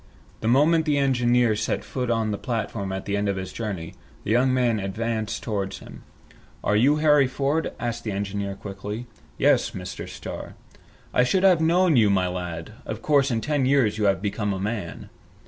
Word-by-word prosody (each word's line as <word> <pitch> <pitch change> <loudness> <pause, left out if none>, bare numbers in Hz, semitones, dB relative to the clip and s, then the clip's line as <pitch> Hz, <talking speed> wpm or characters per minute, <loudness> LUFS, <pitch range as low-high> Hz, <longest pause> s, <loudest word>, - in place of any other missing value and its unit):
The 110 - -3
moment 155 +6 +4
the 145 -1 +2
engineer 125 -4 +3
set 110 +1 -2
foot 125 -2 -3
on 115 -2 +1
the 100 - -3
platform 110 -5 -3
at 95 0 -4
the 100 - -1
end 100 0 0
of 100 - 0
his 95 -1 -5
journey, 100 -8 -5 0.3
the - - -2
young 125 +3 +3
man 120 -4 +2
advanced 110 +2 -3
towards 100 -3 -3
him. - - -12 0.6
"Are 105 - +2
you 130 +8 +4
Harry 150 -3 +4
Ford?" 140 +4 -1
asked 120 0 -3
the 110 - -3
engineer 100 0 -3
quickly. 105 +4 -6 0.3
"Yes, - - +3
Mr. - - -7
Starr." - - -7 0.6
"I 125 - +4
should 185 +9 +1
not 195 - +8
have 175 -3 +3
known 170 -1 +4
you, 110 -3 +5
my 95 -2 +2
lad. 90 0 -5
Of 110 0 -6
course 140 -2 +3
in 115 -3 0
ten 145 -2 0
years 130 -6 +2
you 105 - +1
have 95 -1 +2
become 105 0 -1
a 95 - -4
man!" 100 -3 -4
115 Hz, 195 wpm, -24 LUFS, 100-135 Hz, 0.6 s, not